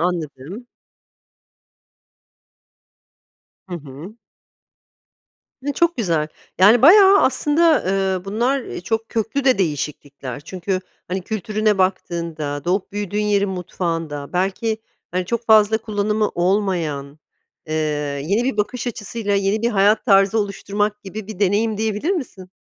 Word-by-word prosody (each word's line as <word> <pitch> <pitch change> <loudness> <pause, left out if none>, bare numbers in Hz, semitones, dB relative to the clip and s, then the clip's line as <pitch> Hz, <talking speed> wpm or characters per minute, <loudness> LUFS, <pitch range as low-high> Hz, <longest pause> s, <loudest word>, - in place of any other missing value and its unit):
Anladım. 170 - -4 3.0
Hı 180 - -6
hı. 155 - -10 1.5
E, 285 - 0
çok 340 +4 +1
güzel. 165 -9 0 0.3
Yani, 215 +6 +6
bayağı 390 +5 +8
aslında, 300 +4 +3
eee, 190 -1 0
bunlar, 240 +7 0
eee, - - -7
çok 225 +5 -2
köklü 230 +5 -2
de 260 -4 +4
değişiklikler. 145 -6 -3
Çünkü, 185 +4 -3 0.3
hani, 185 +1 -2
kültürüne 215 +1 -1
baktığında, 170 -6 -2
doğup 185 +3 -1
büyüdüğün 205 0 -2
yerin 205 -1 +1
mutfağında, 165 -5 -4
belki, 195 +5 -1 0.3
hani, 180 +1 -1
çok 235 +3 -3
fazla 220 0 +5
kullanımı 210 -1 -1
olmayan, 175 -6 -1 0.5
eee, 155 - -3 0.5
yeni 205 +7 +1
bir 260 -4 -1
bakış 235 +5 -2
açısıyla 210 -2 -3
yeni 200 +2 0
bir 235 - +2
hayat 205 +1 +3
tarzı 195 -1 +4
oluşturmak 205 0 -2
gibi 200 +1 -7
bir 215 -3 -8
deneyim 205 +2 +1
diyebilir 220 - -1
misin? 240 - -4
200 Hz, 120 wpm, -20 LUFS, 180-220 Hz, 3.0 s, bayağı